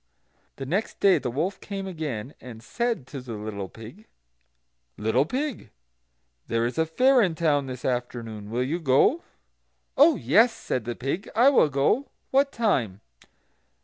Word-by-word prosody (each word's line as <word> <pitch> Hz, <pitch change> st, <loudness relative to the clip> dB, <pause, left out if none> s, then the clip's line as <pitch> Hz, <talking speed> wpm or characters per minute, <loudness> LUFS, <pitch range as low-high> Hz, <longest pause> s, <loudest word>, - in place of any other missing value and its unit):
The 135 Hz, -, -6 dB
next 190 Hz, +11 st, -2 dB
day 190 Hz, -5 st, +5 dB
the 125 Hz, -, -3 dB
wolf 160 Hz, +11 st, -2 dB
came 195 Hz, -1 st, -5 dB
again, 150 Hz, -, -5 dB
and 115 Hz, -3 st, -11 dB
said 235 Hz, -, -2 dB
to 135 Hz, 0 st, -8 dB
the 125 Hz, -2 st, -8 dB
little 105 Hz, -2 st, -6 dB
pig: 120 Hz, -, -13 dB, 0.9 s
"Little 110 Hz, +7 st, +1 dB
pig, 270 Hz, -, -3 dB, 0.8 s
there 115 Hz, 0 st, 0 dB
is 125 Hz, +6 st, -3 dB
a 160 Hz, -, +2 dB
fair 255 Hz, +9 st, +4 dB
in 180 Hz, -6 st, +1 dB
town 150 Hz, -4 st, +1 dB
this 130 Hz, -1 st, -7 dB
afternoon; 115 Hz, -4 st, -4 dB
will 120 Hz, +3 st, -1 dB
you 155 Hz, +7 st, -2 dB
go?" 160 Hz, -, +3 dB, 0.7 s
"Oh 300 Hz, +4 st, +6 dB
yes," 205 Hz, -, +4 dB
said 125 Hz, -, -4 dB
the 120 Hz, 0 st, -4 dB
pig, 140 Hz, -, -4 dB
"I 245 Hz, +4 st, +6 dB
will 255 Hz, -, +4 dB
go; 145 Hz, -, +1 dB, 0.2 s
what 275 Hz, +1 st, +3 dB
time?" 130 Hz, -, 0 dB
145 Hz, 155 wpm, -25 LUFS, -, 0.9 s, Oh